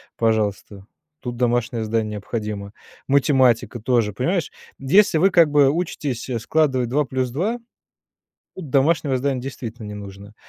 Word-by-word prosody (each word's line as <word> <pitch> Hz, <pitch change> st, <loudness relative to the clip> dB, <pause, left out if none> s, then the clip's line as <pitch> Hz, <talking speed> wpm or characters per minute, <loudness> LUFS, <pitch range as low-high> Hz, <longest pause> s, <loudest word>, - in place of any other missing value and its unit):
пожалуйста, 105 Hz, -3 st, -1 dB, 0.4 s
тут 120 Hz, -1 st, -5 dB
домашнее 120 Hz, -2 st, 0 dB
задание 110 Hz, 0 st, -1 dB
необходимо. 105 Hz, -1 st, -5 dB, 0.4 s
Математика 130 Hz, -4 st, +3 dB
тоже, 115 Hz, -2 st, +1 dB
понимаешь, 165 Hz, -, -1 dB, 0.3 s
если 165 Hz, +6 st, +4 dB
вы, 190 Hz, +4 st, +4 dB
как 165 Hz, -3 st, +5 dB
бы, 145 Hz, -2 st, +5 dB
учитесь 145 Hz, -7 st, -3 dB
складывать 130 Hz, -2 st, +1 dB
2 145 Hz, +4 st, +2 dB
плюс 130 Hz, -1 st, -2 dB
2, 200 Hz, -, -1 dB, 1.0 s
домашнего 145 Hz, -2 st, +1 dB
здания 130 Hz, 0 st, -1 dB
действительно 120 Hz, -4 st, -7 dB
не 105 Hz, -, -7 dB
нужно. 100 Hz, +1 st, -10 dB
125 Hz, 125 wpm, -22 LUFS, 110-145 Hz, 1.0 s, как